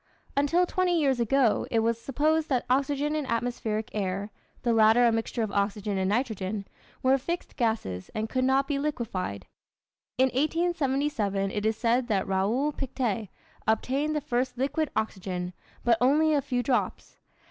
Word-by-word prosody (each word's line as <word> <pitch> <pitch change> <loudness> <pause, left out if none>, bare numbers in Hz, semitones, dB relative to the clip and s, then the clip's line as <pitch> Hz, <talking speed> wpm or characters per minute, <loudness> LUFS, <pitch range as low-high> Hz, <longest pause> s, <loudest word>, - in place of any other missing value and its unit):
Until 295 +6 +3
twenty 360 -1 +1
years 270 -4 +2
ago 235 0 +2
it 225 - +2
was 230 0 0
supposed 310 +5 +1
that 255 -3 +1
oxygen 285 +2 +1
and 305 -3 -2
atmospheric 230 -2 -2
air 200 0 -2 0.3
(the 235 - +2
latter 225 +2 +6
a 235 - +5
mixture 225 +1 -1
of 215 - -3
oxygen 200 0 -1
and 190 0 +1
nitrogen) 210 -3 -1 0.4
were 265 +1 +4
fixed 340 +6 -4
gases 220 - -1
and 215 0 -1
could 255 +3 -1
not 265 +1 +3
be 285 -2 -1
liquefied. 210 - -3 0.7
In 260 +1 +4
1877, 275 - 0
it 210 +2 -1
is 220 - 0
said 240 +1 +1
that 200 -5 0
Raoul 210 +10 +1
Pictet 240 -7 -2 0.4
obtained 270 +7 +1
the 300 - 0
first 255 -2 -1
liquid 280 +4 0
oxygen, 185 -4 -3 0.3
but 230 -2 +3
only 305 +5 +4
a 290 - +3
few 250 -2 -1
drops. 245 0 -1
245 Hz, 160 wpm, -27 LUFS, 215-280 Hz, 0.7 s, latter